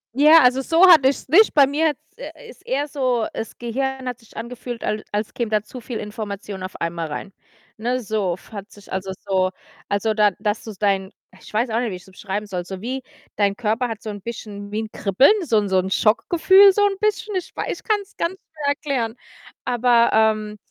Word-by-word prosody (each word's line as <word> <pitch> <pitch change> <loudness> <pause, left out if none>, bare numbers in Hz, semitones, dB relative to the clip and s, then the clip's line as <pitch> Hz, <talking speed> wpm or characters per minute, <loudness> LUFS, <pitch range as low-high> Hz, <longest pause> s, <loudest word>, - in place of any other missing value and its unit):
Ja, 305 +3 +7
also, 250 +1 +4
so 330 +7 +5
hatte 300 -7 +7
ich's 280 - -4
nicht. 415 +6 +5
Bei 280 -2 +7
mir 300 +4 +1
hat's 295 - -10
äh, - - -10
ist 475 - -15
eher 285 +3 0
so, 255 -5 0
das 225 - -6
Gehirn 265 +2 -3
hat 250 -1 -4
sich 230 - -18
angefühlt, 240 0 -6
al 210 0 -2
als 210 +1 -2
käme 235 -3 -2
da 215 -1 +1
zu 245 +3 -10
viel 235 0 -5
Information 205 -2 -6
auf 185 0 -7
einmal 170 -1 -3
rein. 170 +6 -7 0.4
Ne, 245 +3 -1
so 205 -6 -1
f 180 - -19
hat 200 -1 -8
sich, 205 0 -13
also, 190 0 -3 0.2
so 185 -1 +2 0.4
also, 205 +2 0
da 210 -1 +4
dass 210 +1 -1
so 220 - -7
dein 195 -2 0 0.3
ich - - -14
weiß 225 +3 0
auch 225 - +1
nicht 240 -1 -1
wie 185 - -5
ich's 180 - -12
beschreiben 195 +2 -5
soll, 180 -3 -4
so 190 +1 -7
wie 255 +6 -4 0.4
dein 200 -1 +2
Körper 235 +2 0
hat 225 -2 -7
so 215 - -4
'n 205 -1 -8
bisschen 205 -2 -7
wie 215 +1 -2
'n 215 - -9
Kribbeln, 205 - +4
so 235 -9 +2
'n 205 -1 +1
so 190 -1 +2
'n 185 +1 -2
Schockgefühl 345 - +5
so 410 +1 +3
'n 390 -1 0
bisschen. 425 -1 -1
Ich 365 -2 -3
weiß - - -3
ich - - -20
kann's 415 -2 -2
ganz 340 +3 -2
schwer 305 -5 -7
erklären. 275 -6 -1 0.5
Aber, 240 -1 +3
ähm 215 -1 +2
225 Hz, 220 wpm, -22 LUFS, 205-270 Hz, 0.5 s, Ja